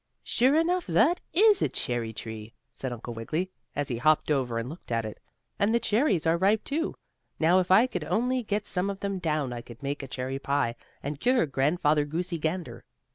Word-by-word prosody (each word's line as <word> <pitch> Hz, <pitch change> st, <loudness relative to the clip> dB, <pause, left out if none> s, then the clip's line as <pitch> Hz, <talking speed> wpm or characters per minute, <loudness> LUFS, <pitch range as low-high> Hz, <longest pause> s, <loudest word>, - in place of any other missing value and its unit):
"Sure 260 Hz, +4 st, +3 dB
enough, 345 Hz, +2 st, +1 dB
that 240 Hz, -, +3 dB
is 415 Hz, +2 st, +5 dB
a -, -, +2 dB
cherry 120 Hz, -2 st, -1 dB
tree," 110 Hz, 0 st, -8 dB, 0.2 s
said 130 Hz, -, -4 dB
Uncle 120 Hz, 0 st, -6 dB
Wiggily, 155 Hz, +11 st, -3 dB, 0.2 s
as 145 Hz, -1 st, -1 dB
he 120 Hz, -, -2 dB
hopped 155 Hz, +4 st, +3 dB
over 130 Hz, -5 st, 0 dB
and 115 Hz, +1 st, -2 dB
looked 155 Hz, -2 st, -10 dB
at 115 Hz, -1 st, 0 dB
it. 110 Hz, -, -7 dB, 0.4 s
"And 215 Hz, +3 st, +3 dB
the -, -, +4 dB
cherries 215 Hz, -, +1 dB
are 165 Hz, +1 st, +3 dB
ripe, 205 Hz, +4 st, +3 dB
too. 320 Hz, +4 st, -2 dB, 0.4 s
Now, 170 Hz, +3 st, +4 dB
if 185 Hz, -, -1 dB
I 200 Hz, +6 st, +7 dB
could 180 Hz, -11 st, -4 dB
only 245 Hz, +10 st, +1 dB
get 210 Hz, -2 st, -2 dB
some 185 Hz, +2 st, -1 dB
of 200 Hz, -1 st, -5 dB
them 200 Hz, -1 st, -2 dB
down 150 Hz, -7 st, -1 dB
I 120 Hz, -, -5 dB
could 120 Hz, +3 st, -13 dB
make 140 Hz, +1 st, -2 dB
a 135 Hz, -, -7 dB
cherry 130 Hz, +1 st, -4 dB
pie, 140 Hz, -4 st, 0 dB, 0.3 s
and 145 Hz, 0 st, -4 dB
cure 250 Hz, -, +3 dB
Grandfather 150 Hz, +2 st, +2 dB
Goosey 170 Hz, +3 st, -3 dB
Gander." 155 Hz, -7 st, -3 dB
160 Hz, 205 wpm, -28 LUFS, 130-205 Hz, 0.4 s, I